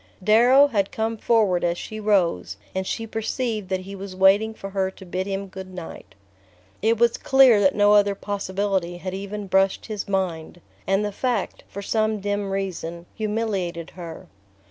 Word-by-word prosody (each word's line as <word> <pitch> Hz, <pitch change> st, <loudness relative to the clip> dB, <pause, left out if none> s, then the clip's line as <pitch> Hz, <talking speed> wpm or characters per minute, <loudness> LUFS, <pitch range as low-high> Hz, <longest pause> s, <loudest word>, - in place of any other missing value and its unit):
Darrow 245 Hz, +7 st, +6 dB
had 205 Hz, -8 st, 0 dB
come 225 Hz, +1 st, -1 dB
forward 210 Hz, -5 st, +2 dB
as 170 Hz, 0 st, +1 dB
she 215 Hz, +4 st, -7 dB
rose, 175 Hz, -, +1 dB, 0.2 s
and 190 Hz, 0 st, -2 dB
she 225 Hz, -, -3 dB
perceived 225 Hz, -2 st, -3 dB
that 190 Hz, -1 st, -1 dB
he 195 Hz, +2 st, -8 dB
was 195 Hz, -1 st, -8 dB
waiting 195 Hz, +4 st, +4 dB
for 195 Hz, -3 st, -8 dB
her 190 Hz, -1 st, 0 dB
to 190 Hz, 0 st, -13 dB
bid 185 Hz, +2 st, -3 dB
him 195 Hz, 0 st, -3 dB
good 190 Hz, -1 st, -9 dB
night. 180 Hz, -3 st, -9 dB, 0.7 s
It 225 Hz, +3 st, +2 dB
was 235 Hz, +1 st, +3 dB
clear 265 Hz, -5 st, +6 dB
that 190 Hz, -, +3 dB
no 205 Hz, 0 st, +5 dB
other 205 Hz, -1 st, +4 dB
possibility 195 Hz, -3 st, -2 dB
had 185 Hz, +1 st, -5 dB
even 200 Hz, +2 st, -5 dB
brushed 195 Hz, 0 st, +2 dB
his 215 Hz, -3 st, -5 dB
mind; 175 Hz, -4 st, -2 dB, 0.3 s
and 195 Hz, +2 st, +2 dB
the 205 Hz, -, -2 dB
fact, 235 Hz, -1 st, -2 dB
for 200 Hz, -, -7 dB
some 215 Hz, +1 st, 0 dB
dim 205 Hz, 0 st, -2 dB
reason, 175 Hz, -3 st, -4 dB
humiliated 205 Hz, -6 st, -2 dB
her. 170 Hz, -3 st, -9 dB
200 Hz, 170 wpm, -23 LUFS, 185-215 Hz, 0.7 s, Darrow